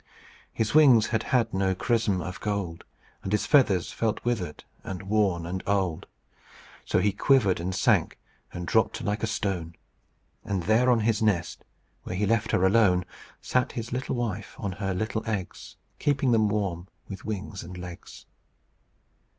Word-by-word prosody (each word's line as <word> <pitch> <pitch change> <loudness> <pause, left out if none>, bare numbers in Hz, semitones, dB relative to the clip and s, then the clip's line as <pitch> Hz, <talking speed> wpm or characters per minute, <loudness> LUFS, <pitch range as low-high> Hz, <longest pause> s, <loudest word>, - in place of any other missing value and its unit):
"His 110 -1 -1
wings 130 -8 +6
had 110 -1 0
had 115 -3 +2
no 95 -1 +1
chrism 110 -3 +1
of 90 +3 -6
gold, 100 -5 -3 0.4
And 95 - -5
his 105 - +1
feathers 105 - +3
felt 115 0 -2
withered 95 -11 -2 0.2
and 95 0 -6
worn 95 -4 +1
and 90 +2 -4
old; 95 -5 0 0.8
So - - +1
he 100 +3 +3
quivered 105 -7 +3
and 90 +2 -3
sank, - - +2 0.3
and 90 0 -6
dropped 110 +5 +1
like 105 +1 -1
a 115 - 0
stone. 90 -6 -3 0.7
And 95 -3 -2
there 110 +7 +3
on 120 -2 +4
his 110 0 +1
nest, 95 -6 0 0.4
where 90 - -6
he 105 +3 +1
left 110 +1 +1
her, 90 - +2
alone, 95 -3 +4 0.4
Sat 125 -1 0
his 115 -1 -5
little 130 +1 -2
wife 110 -3 -4
on 100 - -3
her 95 0 -3
little 110 +3 -2
eggs, 100 -4 -5 0.2
Keeping 140 -3 +1
them 110 -2 +3
warm 95 -4 -2 0.2
with 95 - -8
wings 100 -2 -5
and 90 +1 -9
legs. 90 -1 -10
100 Hz, 160 wpm, -27 LUFS, 90-115 Hz, 0.8 s, wings